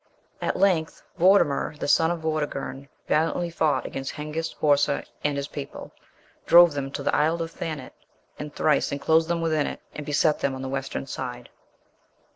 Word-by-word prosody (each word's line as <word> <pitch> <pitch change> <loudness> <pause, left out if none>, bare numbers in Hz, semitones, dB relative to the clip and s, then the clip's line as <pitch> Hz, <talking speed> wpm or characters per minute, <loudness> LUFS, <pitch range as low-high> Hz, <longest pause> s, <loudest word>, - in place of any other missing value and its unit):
At - - -1
length 180 -5 +1 0.2
Vortimer, 170 -5 +3
the - - -4
son 160 +3 +4
of 170 -1 -2
Vortigern, 145 -3 -3 0.2
valiantly 165 +2 +1
fought 155 -2 +1
against 135 0 -5
Hengist, 155 +2 -4
Horsa, 145 -1 +2 0.2
and 145 -1 0
his 140 0 -3
people; 145 -1 -8 0.6
drove 175 -2 +8
them 140 -1 -3
to - - -4
the - - +1
isle 160 +3 +2
of 165 0 -3
Thanet, 155 -5 -6 0.5
and 150 0 -6
thrice 150 0 +1
enclosed 160 +3 +2
them 170 0 -1
within 155 -3 +1
it, - - -5
and 150 - -6
beset 150 +1 +2
them 135 -1 -1
on 130 - -6
the 130 - -4
Western 135 0 -3
side. 125 -3 -6
150 Hz, 170 wpm, -25 LUFS, 140-165 Hz, 0.6 s, drove